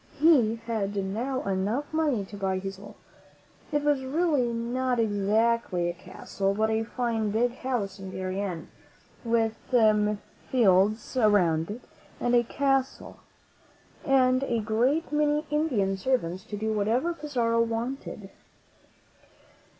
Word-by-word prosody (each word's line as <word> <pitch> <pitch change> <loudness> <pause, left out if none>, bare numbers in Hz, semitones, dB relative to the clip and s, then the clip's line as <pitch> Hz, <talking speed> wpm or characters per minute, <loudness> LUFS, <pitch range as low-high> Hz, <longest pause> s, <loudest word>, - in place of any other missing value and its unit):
He 275 -8 +5
had 210 -3 -2
now 225 +7 -2
enough 200 +10 -2
money 295 -10 +1
to 195 - -11
buy 190 -1 -1
his 195 0 -5
castle. 200 +1 -12 0.8
It 295 -1 0
was 290 -2 +1
really 285 -3 +1
not 245 +2 -1
exactly 210 -3 +1
a - - -10
castle, 190 +2 -3
but 220 +1 +1
a 220 0 +1
fine, 230 -2 -1
big 235 +4 0
house 215 -7 -3
in 190 -1 -7
Darien, 185 -2 -4 0.5
with 230 -1 +1 1.0
fields 215 -1 +3
around 180 -8 +3
it 220 +4 -6 0.4
and 240 -1 +2
cattle, 270 -1 -1 0.8
and 255 -2 +3
a 240 -4 0
great 240 +10 0
many 300 0 +1
Indian 250 -11 +1
servants 190 -6 -1
to 210 - -6
do 220 +1 -1
whatever 230 +11 +1
Pizarro 245 -7 0
wanted. 230 -3 -4
230 Hz, 120 wpm, -27 LUFS, 200-260 Hz, 1.0 s, He